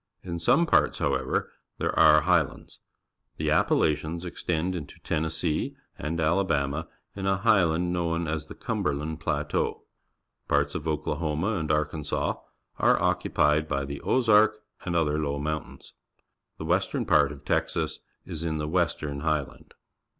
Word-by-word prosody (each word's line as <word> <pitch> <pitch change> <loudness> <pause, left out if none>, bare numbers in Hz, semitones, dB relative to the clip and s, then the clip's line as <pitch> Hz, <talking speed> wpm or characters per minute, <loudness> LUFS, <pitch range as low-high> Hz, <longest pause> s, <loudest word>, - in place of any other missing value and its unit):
In 85 -2 -4
some 125 - +4
parts, - - +3
however, - - -1 0.3
there - - 0
are 75 0 +6
highlands. 85 -3 0 0.6
The - - 0
Appalachians 80 +3 +1
extend 85 0 -2
into 75 -5 -7
Tennessee 80 -1 -1 0.2
and 80 +3 -3
Alabama 80 -3 +1 0.3
in 95 -1 -3
a 95 0 +2
highland 90 -5 +2
known 85 -1 -1
as 75 0 -3
the - - -10
Cum - - -3
berland 75 +3 -2
Plateau. 75 0 -1 0.6
Parts 70 0 +1
of 80 -3 -4
Oklahoma 80 +3 -1
and 85 -8 -1
Arkansas 75 -1 -1 0.4
are - - +4
occupied 75 +1 +2
by 70 -1 -1
the 70 +1 -6
Ozark 110 -3 +4 0.3
and 85 -2 -2
other 75 -2 +1
low 70 -2 -1
mountains. 75 +1 -5 0.6
The 80 - -6
western 90 +4 0
part 70 -1 +4
of 70 -3 -11
Texas - - -1 0.3
is 85 -3 -6
in 80 -2 -1
the 75 0 -2
Western 75 -4 -1
Highland. 75 -2 -3
80 Hz, 140 wpm, -27 LUFS, 75-85 Hz, 0.6 s, are